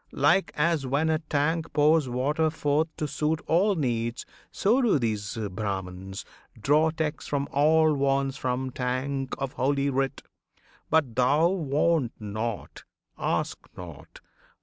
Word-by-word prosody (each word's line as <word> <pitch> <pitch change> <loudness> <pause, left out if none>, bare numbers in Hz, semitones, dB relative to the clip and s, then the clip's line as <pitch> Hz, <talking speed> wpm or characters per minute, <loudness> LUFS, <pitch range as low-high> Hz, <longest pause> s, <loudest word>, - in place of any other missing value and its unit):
like 160 +8 +3
as 160 -1 +1
when 145 +5 +1
a 155 - +1
tank 160 +1 -1
pours 150 -2 +3
water 145 +6 +1
forth 155 0 0
To 150 - -2
suit 150 +2 -1
all 190 +5 +3
needs, 120 -5 -2 0.2
so 230 +7 +2
do 235 - +3
these 110 -5 -2 0.2
Brahmans 95 -1 -5 0.3
draw 150 +7 +3
Text 160 -1 -3
for 140 -1 0
all 155 +2 +4
wants 135 -1 +1
from 130 -1 -2
tank 130 +2 -2
of 135 -1 -4
Holy 140 +1 +1
Writ. 135 0 -1 0.7
But 145 -7 +2
thou, 140 +7 +3
want 155 -5 +1
not! 110 +1 -5 0.3
ask - - -1 0.2
not! 85 -5 -11
140 Hz, 130 wpm, -27 LUFS, 125-160 Hz, 0.7 s, all